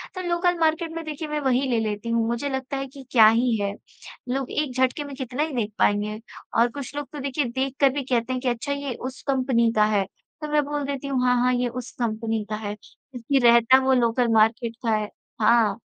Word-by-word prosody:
तो 370 - -4
local 350 0 +1
market 320 +1 +1
में 330 0 -5
देखिए 310 0 -5
मैं 300 0 -2
वही 260 -1 +2
ले 235 - +2
लेती 215 +1 -3
हूँ। 230 -1 +1
मुझे 235 +5 -2
लगता 265 +1 -3
है 270 - -4
कि 270 +1 -12
क्या 220 -4 +7
ही 230 +1 +3
है, 200 0 -1 0.6
लोग 265 +1 -2
एक 295 -4 -1
झटके 260 +3 +1
में 285 -1 -8
कितना 260 +1 -3
ही 310 -2 -4
देख 215 -3 -1
पाएँगे। 210 +1 +1 0.4
और 240 +1 +4
कुछ 280 +1 -7
लोग 290 -1 -4
तो 295 - -6
देखिए 275 +1 -1
देख 265 +2 -2
कर 275 -1 +6
भी 285 -1 -2
कहते 250 0 -1
हैं 255 - -3
कि 255 - 0
अच्छा 240 +4 -3
ये 280 -2 -4 0.2
उस 265 - -13
कंपनी 255 -4 +2
का 210 0 +5
है। 205 -2 +1 0.4
तो 300 - -4
मैं 300 -1 +3
बोल 290 0 -3
देती 280 0 -4
हूँ 270 -2 0
हाँ, 250 0 +4
हाँ, 250 0 +3
ये 245 0 +1
उस 250 0 -7
कंपनी 225 -1 -1
का 215 - -2
है, 210 -1 -4
जब्कि 260 +4 -4
रहता 235 +2 +6
वो 265 - +4
लोकल 240 -1 +2
मार्केट 225 +2 +2
का 220 -1 +3
है। 210 -1 -2 0.3
हाँ। 220 -2 +3
255 Hz, 235 wpm, -24 LUFS, 230-280 Hz, 0.6 s, क्या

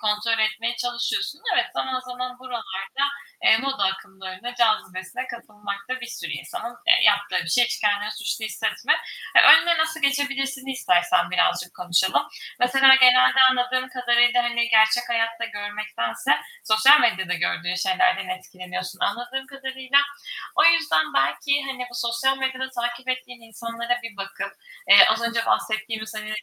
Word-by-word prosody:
kontrol 215 +1 0
etmeye 225 +3 -3
çalışıyorsun. 245 +5 -3
Evet, - - +2
zaman 260 -1 -3
zaman 250 0 -7
buralarda, 240 -1 -6 0.4
eee, 220 - +6
moda 270 -4 -2
akımlarına, 190 +4 -6
cazibesine 215 0 -1
kapılmak 210 -3 -8
da 255 0 -3
bir - - -7
sürü - - -7
insanın, 240 +1 -7
eee, - - +6
yaptığı 205 -1 +2
bir - - -7
şey. 245 +7 +3
Hiç - - -4
kendini 210 0 0
suçlu 215 +1 -4
hissetme. 215 - -1 0.4
Eee, - - +9
"Önüne 340 -1 +7
nasıl 320 0 -1
geçebilirsin?"i 275 -1 -1
istersen 180 -7 +1
birazcık 180 -1 0
konuşalım. 180 +1 0 0.3
Mesela 265 +2 +6
genelde 255 0 +5
anladığım 255 0 -1
kadarıyla, 240 -1 +2
hani, 235 0 0
gerçek 220 +2 +3
hayatta 230 0 -1
görmektense 210 0 -3 0.3
sosyal 250 +7 +6
medyada 190 -6 0
gördüğün 175 +1 -2
şeylerden 370 - 0
etkileniyorsun 185 - -7
anladığım 245 +5 -3
kadarıyla. 265 0 -1 0.6
O - - +3
yüzden 160 - +3
belki, 280 - 0
hani, 265 -2 -5
bu 245 - -14
sosyal 240 +3 -1
medyada 260 0 -3
takip 240 0 -5
ettiğin 255 -1 -5
insanlara 230 +2 -4
bir 230 -3 -9
bakıp, 195 0 -6 0.4
eee, - - +9
az 220 +2 +1
önce 235 -1 -2
bahsettiğimiz, 215 0 -2
hani, 215 0 -7
235 Hz, 145 wpm, -23 LUFS, 210-255 Hz, 0.6 s, Eee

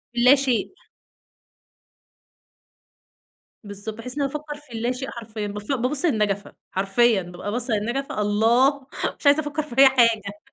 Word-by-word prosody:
اللا 250 +3 +6
شئ. 260 -6 0 2.9
بالضبط، 205 +1 -7
بحيث 250 +4 -5
إن - - 0
أفكّر 295 +2 -3
في 290 -5 -15
اللا 235 +2 -1
شئ 265 +1 -5
حرفيًا، 220 -2 -6
باف 205 0 -7
بابص 270 +5 +1
للنجفة، 210 - 0 0.2
حرفيًا 200 +3 +2
بابقى 180 +3 -7
باصّة 240 0 -1
للنجفة 235 +3 -2
الله! 240 +7 +2 0.3
مش - - -14
عايزة 285 +1 +6
أفكر 295 +1 -3
في 265 -4 -11
أي 275 - +10
حاجة 225 -6 +2
240 Hz, 135 wpm, -23 LUFS, 210-275 Hz, 2.9 s, أي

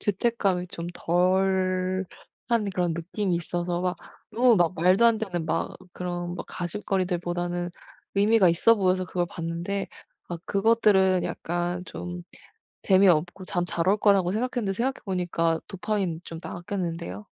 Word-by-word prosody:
죄책감이 195 -4 0
좀 170 0 -6
덜한 185 +1 +1 0.7
그런 175 -2 +1
느낌이 180 +3 -2
있어서 175 +1 -1
막 180 -1 -1 0.3
너무 240 -1 +4
막 175 0 +2
말도 185 +7 +4
안되는 200 -8 0
막 165 +1 -1 0.2
그런 175 -1 -4
막 - - -6
가십거리들보다는 175 -2 -2 0.4
의미가 205 -1 +5
있어 205 +7 +5
보여서 185 -1 +1
그걸 175 -1 -1
봤는데 170 +4 -3 0.4
아 175 - -3
그것들은 195 -3 +3
약간 175 +1 -2
좀 90 0 -6 0.6
재미없고 185 -1 +3
잠 175 -1 -1
잘 170 0 -2
올 205 - +5
거라고 195 -4 +3
생각했는데 230 -3 -1
생각해 260 +6 -2
보니까 170 -3 0
도파민 190 -4 -2
좀 165 - -7
나왔겠는데요. 170 - -5
180 Hz, 305 characters per minute, -26 LUFS, 175-195 Hz, 0.7 s, 의미가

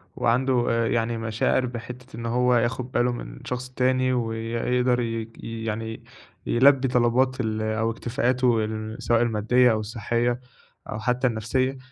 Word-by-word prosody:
وعنده 125 +1 +2
آآ، 115 -1 +1
يعني 115 0 0
مشاعر 110 +3 0
بِحتّة 125 0 -8
إن 115 - -6
هو 125 +1 +2
ياخد 125 +2 0
باله 125 -1 +2
من 120 - -7
شخص 125 0 -4
تاني، 130 0 +1
ويقدر 120 +1 0
ي 115 -1 -3
ي 115 0 -5
يعني 110 +1 -4 0.4
يلبّي 135 +2 +4
طلبات 125 +2 +2
ال 110 -2 -1
أو 110 +1 0
اكتفاءاته 120 -1 +1
ال 110 0 -5
سواء 120 -1 +3
الماديّة 120 +2 +3
أو 110 - +1
الصحيّة 115 +3 -1 0.5
أو 110 - -4
حتى 125 +3 +1
النفسيّة 130 +4 -1
120 Hz, 145 wpm, -25 LUFS, 115-125 Hz, 0.5 s, يلبّي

